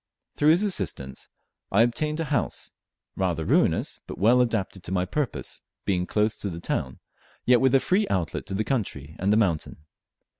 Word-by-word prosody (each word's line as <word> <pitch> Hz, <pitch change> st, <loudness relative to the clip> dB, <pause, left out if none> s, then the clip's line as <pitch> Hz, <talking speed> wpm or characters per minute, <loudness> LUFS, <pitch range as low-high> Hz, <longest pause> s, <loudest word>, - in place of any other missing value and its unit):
Through 150 Hz, -, +4 dB
his 170 Hz, +6 st, +5 dB
assistance 95 Hz, -, -3 dB, 0.4 s
I 105 Hz, +4 st, +5 dB
obtained 150 Hz, +6 st, 0 dB
a -, -, +1 dB
house; -, -, -1 dB, 0.4 s
rather 85 Hz, -4 st, -1 dB
ruinous, -, -, +2 dB
but -, -, -7 dB
well 120 Hz, +6 st, +5 dB
adapted 110 Hz, -6 st, -1 dB
to -, -, -5 dB
my 90 Hz, -1 st, +1 dB
purpose, 140 Hz, +8 st, -3 dB, 0.2 s
being 90 Hz, -2 st, 0 dB
close 105 Hz, +1 st, +1 dB
to 100 Hz, -, -3 dB
the 85 Hz, -2 st, -6 dB
town, 65 Hz, -6 st, -2 dB, 0.5 s
yet 125 Hz, -1 st, +5 dB
with 130 Hz, 0 st, +4 dB
a -, -, +7 dB
free 195 Hz, +8 st, +1 dB
outlet 90 Hz, -4 st, -2 dB
to 95 Hz, -, -3 dB
the 105 Hz, -, 0 dB
country 80 Hz, -, -3 dB
and 95 Hz, +2 st, +1 dB
the 105 Hz, -, +4 dB
mountain. 85 Hz, -7 st, 0 dB
105 Hz, 180 wpm, -26 LUFS, 90-130 Hz, 0.5 s, a